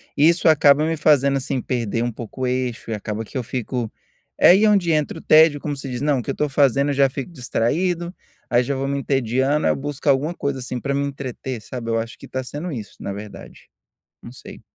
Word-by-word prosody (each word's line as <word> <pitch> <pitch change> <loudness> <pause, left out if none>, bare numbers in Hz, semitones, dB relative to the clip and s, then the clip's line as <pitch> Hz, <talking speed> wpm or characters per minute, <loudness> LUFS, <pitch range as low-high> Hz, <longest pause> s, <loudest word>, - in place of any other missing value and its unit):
isso 165 +4 +4
acaba 150 -1 +5
me 165 - 0
fazendo, 140 -3 +3
assim, 135 -1 -2
perder 115 -3 -2
um 120 0 -1
pouco 120 +3 -9
o - - +1
eixo 125 -2 -2
e - - 0
acaba 105 +1 -4
que 130 - -7
eu 125 - -2
fico 125 -1 -4 0.5
é - - +7
aí 195 +4 +5
onde 195 -5 +3
entra 150 -1 -1
o - - -9
tédio 155 -1 +5
como 145 0 -3
se 135 0 -7
diz 125 -1 -4
não, 145 -3 +1
que - - -9
eu - - +2
estou 150 - -1
fazendo 140 0 +2
eu - - 0
já 135 -1 +3
fico 135 +4 -6
distraído, 170 +7 -1 0.3
aí 120 +1 +3
já 140 +3 -2
vou 135 0 -2
me 140 0 -1
entediando, 135 +2 0
aí - - +4
eu - - -4
busco 145 +1 -6
alguma 140 +5 +2
coisa, 140 -5 -3
assim, 125 0 -5
para 140 +2 -2
me 140 +1 0
entreter 130 -3 -5
sabe, 115 0 -7
eu 115 - +1
acho 115 +2 -6
que - - -12
está 130 - -4
sendo 150 +7 -6
isso 110 -7 -7
na 100 - -4
verdade, 105 +1 -10 0.6
não - - -10
sei. - - -12
135 Hz, 235 wpm, -21 LUFS, 125-145 Hz, 0.6 s, é